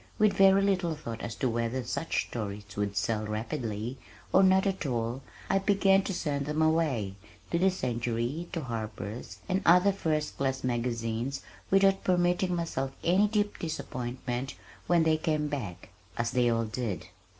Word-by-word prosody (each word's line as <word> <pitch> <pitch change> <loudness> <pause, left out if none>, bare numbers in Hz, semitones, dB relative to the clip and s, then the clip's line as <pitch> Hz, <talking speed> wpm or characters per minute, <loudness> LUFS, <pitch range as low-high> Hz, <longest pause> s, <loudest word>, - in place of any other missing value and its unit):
With 215 -2 +4
very 195 0 +6
little 185 -5 +1
thought 115 -7 -6
as 115 - -5
to 130 - 0
whether 120 +2 -1
such 145 +7 -1
stories 105 -3 -5
would 100 -1 -2
sell 110 +1 0
rapidly 110 +2 -3 0.3
or 190 - +7
not 190 0 +5
at 195 -1 -1
all 120 +1 -2 0.3
I 195 - +3
began 195 0 +4
to 195 - -2
send 140 -4 -2
them 150 +1 -1
away, 155 -11 +2 0.4
to 170 - +2
the 190 +2 +5
Century, 120 0 -2
to 165 - -2
Harper's, 110 -3 -5
and 190 0 +1
other 180 +4 +6
first 155 -6 -1
class 130 -1 -1
magazines 120 +1 -2 0.3
without 195 0 +4
permitting 180 0 +2
myself 135 -6 -2
any 185 +5 +4
deep 205 -1 0
disappointment 130 -4 -4 0.3
when 175 -2 +4
they 160 -1 +3
came 155 -2 0
back 120 -12 -5 0.3
as 115 0 0
they 125 -1 +3
all 115 0 +1
did! 110 -6 -3
135 Hz, 160 wpm, -29 LUFS, 115-180 Hz, 0.4 s, or